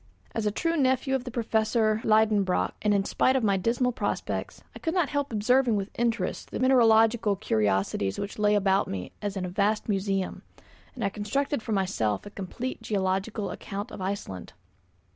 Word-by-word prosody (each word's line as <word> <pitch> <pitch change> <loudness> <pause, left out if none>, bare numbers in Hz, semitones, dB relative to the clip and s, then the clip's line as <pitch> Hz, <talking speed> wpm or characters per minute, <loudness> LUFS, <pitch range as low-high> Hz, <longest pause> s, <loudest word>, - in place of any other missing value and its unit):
As 220 -2 -1
a - - +2
true 330 +10 0
nephew 265 -2 +1
of 265 -1 0
the - - -4
Professor 220 -2 +1
Liedenbrock, 215 -4 +3
and 210 - +2
in 200 -1 +2
spite 260 - +2
of 260 - +1
my 200 -2 +3
dismal 235 +6 +1
prospects, 245 - -3
I - - -8
could 325 +1 -2
not 345 -6 +2
help 285 -2 -1
observing 235 +2 +3
with 200 0 -3
interest 235 -1 -1
the - - -4
mineralogical 225 -4 +4
curiosities 100 - 0
which 200 +1 -5
lay 210 0 +3
about 195 -1 +2
me 90 -2 -5
as 205 -1 -3
in 185 - -2
a - - -4
vast 205 +3 0
museum, 195 -2 -1 0.5
and 245 - -4
I 200 - +2
constructed 225 +7 -2
for 220 - -3
myself 150 - 0
a 205 - -9
complete 235 +7 -5
geological 195 +1 -1
account 205 +3 -6
of - - -8
Iceland. 185 - -5
210 Hz, 180 wpm, -27 LUFS, 195-240 Hz, 0.5 s, mineralogical